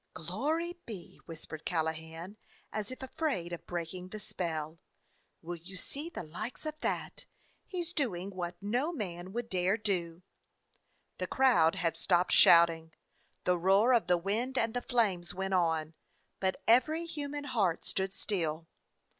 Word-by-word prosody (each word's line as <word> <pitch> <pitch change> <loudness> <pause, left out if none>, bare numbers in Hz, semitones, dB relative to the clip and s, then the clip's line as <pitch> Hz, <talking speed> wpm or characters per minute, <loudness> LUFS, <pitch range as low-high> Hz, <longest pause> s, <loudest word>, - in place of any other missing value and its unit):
"Glory 300 - -2
be!" 200 -7 -8
whispered 160 -1 -8
Callahan, 160 +2 -2 0.4
as 215 -1 -3
if 255 +1 -8
afraid 265 - -2
of 170 - -7
breaking 175 +1 -4
the 215 +3 -7
spell. 165 -6 -4 0.6
"Will 175 +1 -4
you 185 +3 -10
see 290 - -5
the 320 - -6
likes 215 - -6
of 310 0 -3
that! - - -2 0.4
He 365 -3 -2
's 340 +1 -5
doing 200 - -1
what 175 -2 -4
no 245 +10 +1
man 185 - -5
would 235 +2 -3
dare 185 +1 +2
do!" 180 -5 -1 1.0
The - - -1
crowd 230 -11 +4
had 165 -3 0
stopped 180 +1 +3
shouting; 165 -1 +6 0.5
the 180 -1 +2
roar 195 +8 +5
of 230 -8 +3
the 180 -1 +4
wind 225 +9 -1
and 225 -2 +2
the 245 - -1
flames 195 -10 +1
went 190 +1 -2
on, 165 -3 +1 0.5
but 190 -1 -1
every 310 +8 +4
human 290 -3 -4
heart 215 - 0
stood 190 0 -1
still. 165 -5 -1
190 Hz, 150 wpm, -32 LUFS, 170-245 Hz, 1.0 s, shouting